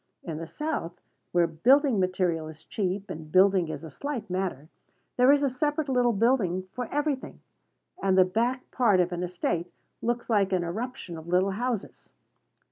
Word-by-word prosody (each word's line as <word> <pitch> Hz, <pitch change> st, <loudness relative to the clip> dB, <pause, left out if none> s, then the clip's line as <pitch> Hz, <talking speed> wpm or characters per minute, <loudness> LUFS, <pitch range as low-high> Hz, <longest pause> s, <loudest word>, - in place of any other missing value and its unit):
In 160 Hz, -3 st, -5 dB
the 165 Hz, -, -6 dB
South, 180 Hz, -, -4 dB, 0.3 s
where 175 Hz, -1 st, +4 dB
building 240 Hz, -, +3 dB
material 180 Hz, -3 st, 0 dB
is 160 Hz, 0 st, -11 dB
cheap, 195 Hz, +2 st, -3 dB
and 155 Hz, -1 st, -8 dB
building 190 Hz, -1 st, +5 dB
is 155 Hz, -, -5 dB
a 160 Hz, -, -8 dB
slight 240 Hz, -, -5 dB
matter, 180 Hz, -6 st, -2 dB, 0.5 s
there 250 Hz, +2 st, +6 dB
is 290 Hz, 0 st, +4 dB
a -, -, +4 dB
separate 295 Hz, +3 st, -1 dB
little 250 Hz, -2 st, +3 dB
building 200 Hz, -5 st, +1 dB
for 250 Hz, -2 st, -4 dB
every 295 Hz, +1 st, +1 dB
thing; 260 Hz, -, -11 dB, 0.6 s
and 190 Hz, -1 st, +2 dB
the 185 Hz, -, +7 dB
back 235 Hz, +7 st, -1 dB
part 220 Hz, -7 st, +3 dB
of 180 Hz, 0 st, +2 dB
an 175 Hz, 0 st, -3 dB
estate 175 Hz, -1 st, -2 dB, 0.3 s
looks 240 Hz, +1 st, -1 dB
like 200 Hz, -4 st, +2 dB
an 180 Hz, -2 st, +1 dB
eruption 180 Hz, -2 st, -5 dB
of 160 Hz, -, -12 dB
little 185 Hz, +3 st, +2 dB
houses. 230 Hz, +1 st, -4 dB
195 Hz, 175 wpm, -27 LUFS, 175-250 Hz, 0.6 s, the